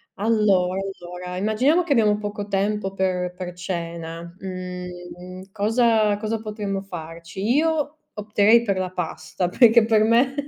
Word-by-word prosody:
Allora, 200 Hz, -4 st, +2 dB, 0.2 s
allora, 180 Hz, +1 st, -7 dB
immaginiamo 245 Hz, -, +2 dB
che 335 Hz, -, -6 dB
abbiamo 210 Hz, -4 st, +3 dB
poco 205 Hz, -1 st, -5 dB
tempo 200 Hz, 0 st, -1 dB
per 180 Hz, -2 st, -1 dB
per 180 Hz, -1 st, -6 dB
cena, 170 Hz, -1 st, -6 dB
mhmm, 180 Hz, 0 st, -8 dB
cosa 215 Hz, 0 st, +2 dB
cosa 215 Hz, +1 st, -3 dB
potremmo 210 Hz, -3 st, -4 dB
farci? 170 Hz, -1 st, -8 dB
Io 310 Hz, -1 st, +1 dB, 0.2 s
opterei 210 Hz, +2 st, +4 dB
per 200 Hz, -4 st, 0 dB
la 185 Hz, -1 st, -2 dB
pasta, 180 Hz, +1 st, -3 dB
perché 230 Hz, +4 st, +5 dB
per 220 Hz, -1 st, +3 dB
me 235 Hz, +4 st, +3 dB
195 Hz, 130 wpm, -23 LUFS, 180-220 Hz, 0.2 s, perché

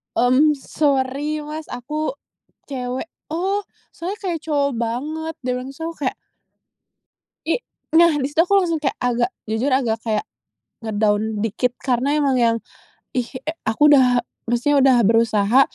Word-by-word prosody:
mmm, 255 Hz, +6 st, +4 dB
"Sori, 285 Hz, +1 st, 0 dB
mas 305 Hz, +1 st, -7 dB
aku 305 Hz, -, -3 dB, 0.6 s
cewek." 255 Hz, +2 st, -3 dB, 0.2 s
"Oh, 380 Hz, +6 st, 0 dB, 0.3 s
soalnya 365 Hz, +5 st, -5 dB
kayak 350 Hz, -4 st, -1 dB
cowok 285 Hz, -2 st, +1 dB
banget," 300 Hz, +8 st, -3 dB
dia 250 Hz, 0 st, 0 dB
bilang, 255 Hz, -, -7 dB
terus 325 Hz, -, -13 dB
aku 330 Hz, 0 st, -5 dB
kayak -, -, -1 dB, 1.3 s
I 335 Hz, +10 st, 0 dB, 0.3 s
nah 335 Hz, 0 st, +7 dB
di 265 Hz, -, 0 dB
situ 315 Hz, +3 st, +3 dB
aku 395 Hz, +3 st, +3 dB
langsung 335 Hz, -4 st, 0 dB
kayak 275 Hz, -, -1 dB
agak, 245 Hz, 0 st, +1 dB, 0.2 s
jujur 220 Hz, +6 st, 0 dB
agak 245 Hz, -4 st, +1 dB
kayak 225 Hz, -, -1 dB, 0.6 s
nge-down 215 Hz, 0 st, 0 dB
dikit 245 Hz, +3 st, -1 dB
karena 265 Hz, +3 st, +1 dB
emang 280 Hz, -3 st, +2 dB
yang, 235 Hz, -2 st, +3 dB, 0.6 s
ih, 250 Hz, -2 st, -1 dB, 0.2 s
e 315 Hz, -, -2 dB, 0.2 s
aku 295 Hz, +7 st, +4 dB
udah 250 Hz, -3 st, +5 dB, 0.2 s
maksudnya 245 Hz, +5 st, +2 dB
udah 265 Hz, -2 st, +5 dB
berusaha 225 Hz, +2 st, +4 dB
265 Hz, 145 wpm, -21 LUFS, 240-305 Hz, 1.3 s, nah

